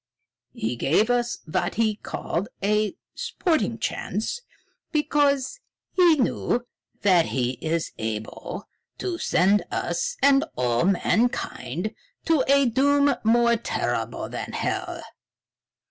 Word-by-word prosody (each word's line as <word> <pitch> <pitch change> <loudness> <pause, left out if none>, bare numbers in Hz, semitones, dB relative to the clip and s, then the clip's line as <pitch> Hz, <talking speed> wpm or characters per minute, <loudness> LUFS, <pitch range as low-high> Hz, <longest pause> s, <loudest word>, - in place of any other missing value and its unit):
He 115 +2 -2
gave 210 - +2
us 240 -1 0
what 155 - -1
he 220 -1 +2
called 195 0 -3
a 210 +4 +1 0.2
'sporting 350 - 0
chance' 220 - -3 0.5
because 290 - +1 0.3
he 350 -3 +5
knew 245 -2 0 0.4
that 180 -5 +5
he 125 -1 -1
is 165 0 -1
able 110 -1 -5 0.3
to 355 -2 -3
send 200 +3 +3
us - - -2
and 280 0 +5
all 120 +2 +1
mankind 195 - 0 0.3
to 320 -5 +3
a 280 0 +5
doom 280 +4 +3
more 235 +1 +4
terrible 230 - -2
than - - -6
hell. - - -3
230 Hz, 110 wpm, -25 LUFS, 175-285 Hz, 0.5 s, he